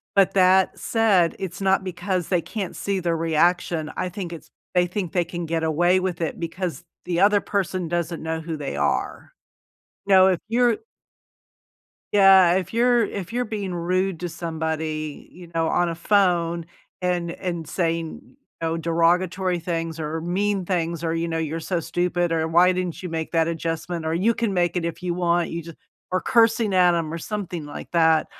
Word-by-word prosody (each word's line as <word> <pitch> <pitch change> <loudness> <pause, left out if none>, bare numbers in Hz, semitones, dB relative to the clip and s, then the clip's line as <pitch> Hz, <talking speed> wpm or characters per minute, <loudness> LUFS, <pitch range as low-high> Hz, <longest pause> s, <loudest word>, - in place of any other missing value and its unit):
but 195 -2 +4
that 190 0 +4
said, 205 -7 +2
it's 185 -3 -5
not 190 -1 +2
because 185 -1 -2
they 180 -3 +2
can't 195 0 -5
see 200 -1 -2
their 170 -2 0
reaction. 165 0 +1
I 185 - -1
think 180 -1 -6
it's 170 - -10 0.2
they 180 0 +4
think 180 -1 -3
they 175 -2 +1
can 175 0 -5
get 165 0 -1
away 175 +4 +3
with 185 -2 -3
it 165 - -2
because 175 +1 -4 0.2
the 175 -1 -1
other 205 +1 +5
person 185 -3 -2
doesn't 170 0 -2
know 160 0 -2
who 160 0 -4
they 145 - -4
are. 75 - -2 0.7
You 200 - +2
know, 190 0 +7
if 185 -3 +2
you're 240 -1 +3 1.4
yeah, 190 -3 +7
if 190 +3 -2
you're 240 0 +4
if 200 -2 -5
you're 245 +1 0
being 205 -4 -4
rude 180 +1 0
to 175 - -3
somebody, 160 -2 -4
you 175 -1 -12
know, 165 -1 +1
on 175 +1 +2
a 165 - -2
phone 170 -2 +1 0.3
and 180 -2 -1
and 170 -4 -5
saying, 165 -2 -2
you - - -23 0.2
know, 165 0 -1
derogatory 175 +2 +1
things 165 -1 -3
or 155 +1 -3
mean 190 +3 -1
things 170 -2 -2
or, 165 0 0
you 165 0 -1
know, 165 0 -2
"You're 160 0 -2
so 175 +2 -1
stupid" 175 +1 -1
or 160 -1 0
"Why 175 +3 +5
didn't 180 -2 -3
you 180 - -4
make 160 -1 -3
that 165 -1 +3
adjustment" 165 0 -3
or 160 - -1
"You 210 +7 +2
can 225 -3 -1
make 175 -1 +1
it 175 - 0
if 170 +1 -4
you 175 -1 -1
want," 175 -1 +1
you 170 0 -4
just 165 0 -11 0.3
or 185 0 +1
cursing 225 -3 +3
at 180 -1 +5
'em 160 -2 -2
or 165 - -3
something 180 -3 -5
like 145 0 -9
that. 160 -2 +4
175 Hz, 190 wpm, -23 LUFS, 165-185 Hz, 1.4 s, know